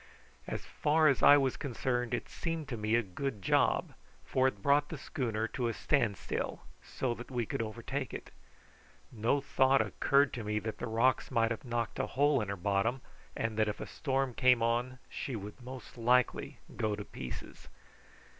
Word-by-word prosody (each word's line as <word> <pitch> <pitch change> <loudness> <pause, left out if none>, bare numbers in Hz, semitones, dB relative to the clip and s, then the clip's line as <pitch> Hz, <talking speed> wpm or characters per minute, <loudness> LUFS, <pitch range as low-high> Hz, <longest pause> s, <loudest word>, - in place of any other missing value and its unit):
As - - -4
far 155 +1 +3
as 140 -4 +3
I 145 - +9
was 135 -2 +1
concerned 125 -2 -1
it - - -5
seemed 165 -3 -4
to 125 - -2
me 110 0 +1
a 120 - +3
good 110 +5 -4
job, - - +2 0.3
for 130 0 +2
it 105 -7 -4
brought 145 +1 +4
the 160 - -5
schooner 115 -6 -2
to 125 -3 -2
a 115 - -2
stand 120 -9 +1
still, - - -3 0.2
so 125 -2 -2
that 120 +1 -9
we 120 -3 -1
could - - -2
overtake 120 +4 -4
it. - - -7 0.8
No 120 +5 +1
thought 135 0 +3
occurred 140 0 +2
to 115 - -4
me 105 0 -1
that 110 +1 -4
the 120 - -3
rocks 115 +3 +2
might 115 0 +2
have 115 - -3
knocked 120 -1 -2
a - - 0
hole 145 -1 +3
in 105 - -4
her 100 - -2
bottom, 100 +7 0 0.4
and 115 -1 -2
that 110 -1 +3
if 105 - -4
a - - -4
storm 135 -3 -1
came 125 -1 +4
on 120 +2 0
she 130 - -4
would 105 +3 -8
most 125 0 -9
likely 125 +1 +2 0.2
go 110 -1 0
to 105 0 -7
pieces. 65 +1 -8
120 Hz, 190 wpm, -32 LUFS, 110-135 Hz, 0.8 s, I